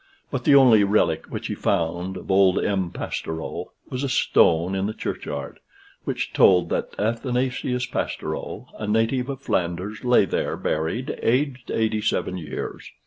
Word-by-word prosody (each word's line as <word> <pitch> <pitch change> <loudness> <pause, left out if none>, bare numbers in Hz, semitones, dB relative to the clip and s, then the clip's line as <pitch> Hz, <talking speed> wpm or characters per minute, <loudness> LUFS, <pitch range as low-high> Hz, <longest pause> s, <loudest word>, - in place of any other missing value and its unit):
But 130 -4 -3
the 140 - +6
only 120 -6 +7
relique 100 -6 +1
which - - -5
he - - -2
found 90 0 -1
of 90 - -6
old 95 -1 +5
M. 95 -3 0
Pastoureau 80 -1 -5 0.2
was 130 +1 -4
a 140 - -1
stone 85 -5 +3
in 95 +1 0
the 110 - -4
churchyard, - - -5 0.5
which - - -3
told 90 -2 +5
that - - -2
Athanasius 125 +3 -1
Pastoureau, - - -4
a 105 - -3
native 115 +4 +1
of 135 -1 -5
Flanders, 90 +1 -2
lay 125 -5 +5
there - - -2
buried, 80 +12 -2
aged 130 +1 0
87 110 -4 0
years. 80 - -6
105 Hz, 145 wpm, -24 LUFS, 90-125 Hz, 0.5 s, only